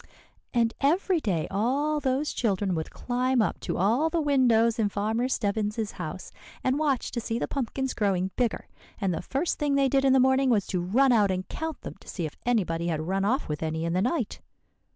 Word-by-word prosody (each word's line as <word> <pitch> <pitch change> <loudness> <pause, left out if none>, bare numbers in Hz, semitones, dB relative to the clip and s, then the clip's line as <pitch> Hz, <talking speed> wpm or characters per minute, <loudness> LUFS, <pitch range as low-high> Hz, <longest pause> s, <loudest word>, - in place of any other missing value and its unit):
"And 230 -2 +2
every 345 +5 +2
day 185 - -1
all 275 +9 +1
those 275 +1 0
children 200 -4 0
would 160 -2 -3
climb 250 +1 0
up 215 - +1
to - - -3
all 230 - +2
the 335 - 0
windows 240 -6 +3
in 210 -2 +2
Farmer 220 +5 -1
Stebbins's 210 -2 -1
house, - - -7 0.3
and 260 +3 +1
watch 280 -5 0
to 235 - -3
see 225 +1 -2
the - - -2
pumpkins 265 0 -2
growing 190 -3 0
bigger. 245 -3 -1 0.3
And 195 -4 0
the - - -3
first 275 - -2
thing 290 -2 +1
they 275 -1 +3
did 270 +1 +2
in 270 -1 +4
the 265 - +5
morning 265 +1 +4
was 210 -5 +2
to 180 -3 0
run 250 +10 +3
out 210 -4 +4
and 185 0 -2
count 320 -1 -5
them - - -8
to - - -19
see 175 - -4
if 155 - -6
anybody 170 -8 +1
had 160 -2 -1
run 195 +2 0
off 260 +7 0
with 150 -1 -4
any 160 0 -2
in 170 - -1
the 185 - +1
night." 245 - -1
230 Hz, 215 wpm, -27 LUFS, 195-270 Hz, 0.3 s, the